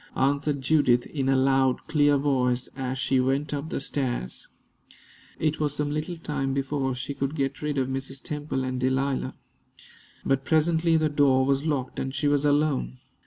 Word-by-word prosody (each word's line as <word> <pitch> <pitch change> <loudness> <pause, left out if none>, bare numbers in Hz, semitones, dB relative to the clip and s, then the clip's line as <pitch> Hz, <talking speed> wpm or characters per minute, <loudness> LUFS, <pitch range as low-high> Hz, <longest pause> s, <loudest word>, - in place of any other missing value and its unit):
answered 140 +1 +1
Judith, 130 -4 +3
in 135 -3 -2
a 135 - +4
loud, 130 -1 +2
clear 145 -2 +3
voice, 130 -3 +1
as 130 -1 -3
she 130 0 +1
went 135 +3 0
up 145 +2 -3
the - - -2
stairs. 130 - -3 0.9
It 155 -1 0
was 150 -1 0
some 145 0 -1
little 155 +4 -3
time 135 -4 -2
before 135 -1 -1
she 125 +3 -4
could 140 +2 -3
get 135 -2 -2
rid 150 -1 -2
of 130 -1 +1
Mrs. 135 0 -4
Temple 145 -2 -3
and 130 0 -2
Delilah. 130 +1 0 0.9
But 135 0 +1
presently 160 +2 +2
the 155 -1 +2
door 140 -3 +3
was 140 +2 +1
locked, 135 -4 -2
and 135 +1 -3
she 145 +2 0
was 145 0 +2
alone. 145 - +1
135 Hz, 170 wpm, -26 LUFS, 130-150 Hz, 0.9 s, a